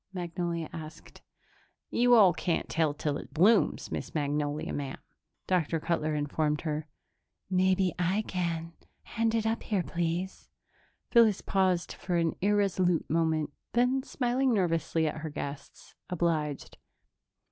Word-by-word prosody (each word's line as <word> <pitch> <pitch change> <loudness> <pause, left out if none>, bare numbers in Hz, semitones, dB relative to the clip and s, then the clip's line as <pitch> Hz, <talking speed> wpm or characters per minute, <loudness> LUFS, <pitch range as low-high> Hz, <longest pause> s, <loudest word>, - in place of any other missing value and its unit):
Magnolia 170 -2 -3
asked. 155 0 -10 0.7
"You 245 0 +5
all 195 -6 +7
can't 175 0 -1
tell 160 -2 +1
till 145 0 -2
it - - -11
blooms, 200 +7 +3
Miss - - -5
Magnolia, 145 0 -1
ma'am," 140 -2 -4 0.5
Dr. 170 -3 +1
Cutler 155 -1 -1
informed 150 +1 0
her. 155 -1 -3 0.6
"Maybe 185 0 +2
I 185 +5 +1
can. 170 -4 -3 0.3
Hand 230 0 -1
it 225 -1 0
up 225 +1 0
here, 200 -5 -1
please." 170 +3 -3 0.6
Phyllis 225 -5 +5
paused 185 -2 +1
for 180 -2 -2
an 165 -1 +1
irresolute 190 -4 +2
moment, 160 -2 +1 0.2
then, 250 +2 +2
smiling 260 0 0
nervously 165 -3 +1
at 155 - -3
her 160 - -4
guests, 140 -1 -8 0.2
obliged. 160 -5 -1
170 Hz, 125 wpm, -29 LUFS, 155-195 Hz, 0.7 s, all